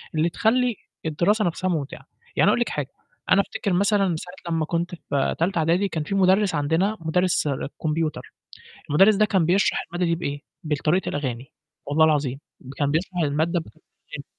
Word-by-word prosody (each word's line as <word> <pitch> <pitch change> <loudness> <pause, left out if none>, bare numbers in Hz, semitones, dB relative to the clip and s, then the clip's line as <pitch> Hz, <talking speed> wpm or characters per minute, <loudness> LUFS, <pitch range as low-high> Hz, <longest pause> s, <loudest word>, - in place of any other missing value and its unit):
اللي 160 +2 +2
تخلّي 240 +4 +1 0.3
الدراسة 185 +7 +1
نفْسها 185 +2 -1
ممتعة، 150 -5 -3 0.3
يعني - - -1
أنا - - +6
أقول - - +1
لِك - - 0
حاجة - - -4 0.4
أنا 200 - +6
أفتكر 195 -1 -3
مثلًا 195 -2 +2
ساعة 180 0 -7
لمّا 160 -1 0
كنت 170 +2 -2
في 140 -4 -1
تالتة 170 +1 +1
اعدادي 170 +5 +2
كان 160 -4 -3
في 195 - -3
مدرِّس 190 -1 +3
عندنا 165 +9 +1
مدرِّس 175 0 +1 0.4
كمبيوتر، 155 0 -2 0.6
المدرِّس 195 +8 +6
ده 215 - +4
كان 190 -6 +2
بيشرح 190 +3 +2
المادة 175 +2 -2
دي - - +3
بإيه 145 -4 -4 0.2
بالطريقة 155 +4 0
الأغاني 130 -3 -4 0.3
والله 155 +3 +3
العظيم 140 -4 +1 0.4
كان 145 -1 0
بيشرح 180 +4 -2
المادة 160 +4 +1
بطريقة - - -15 0.3
الأغاني. - - -7
170 Hz, 170 wpm, -24 LUFS, 155-190 Hz, 0.6 s, أنا